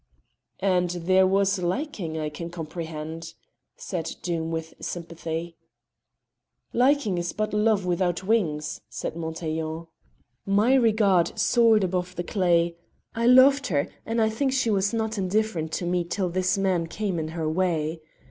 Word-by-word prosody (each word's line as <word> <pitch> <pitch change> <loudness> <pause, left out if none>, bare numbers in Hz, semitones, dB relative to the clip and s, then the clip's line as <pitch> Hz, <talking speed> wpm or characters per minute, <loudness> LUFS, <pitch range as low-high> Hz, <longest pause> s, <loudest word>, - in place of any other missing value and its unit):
"And 180 -2 +2
there 185 +2 +3
was 195 +1 +2
liking; 180 - -2
I 155 -1 -2
can 165 +3 -7
comprehend," 165 -1 -6 0.4
said 165 -3 -4
Doom 165 -2 -2
with 160 0 -4
sympathy. 170 -1 -5 1.2
"Liking 250 -7 +2
is 175 -1 -3
but 215 0 -2
love 210 -2 +2
without 175 0 0
wings," 165 -8 0
said - - -5
Montaiglon. 160 0 -4 0.6
"My 205 +6 +3
regard 210 -8 +3
soared 225 -3 +4
above 180 0 -2
the 175 - -3
clay; 170 -3 +1 0.4
I 230 +1 0
loved 265 +2 +6
her, 145 -5 0
and 225 +1 -2
I 220 - +4
think 265 +4 0
she 255 -4 +1
was 200 0 +1
not 220 -2 -2
indifferent 185 -4 0
to 175 - -2
me 175 0 +1
till 180 +2 -2
this 185 +2 0
man 185 -4 +1
came 195 -1 -2
in 155 - -3
her 160 0 -3
way. 160 -2 0
180 Hz, 145 wpm, -25 LUFS, 165-210 Hz, 1.2 s, loved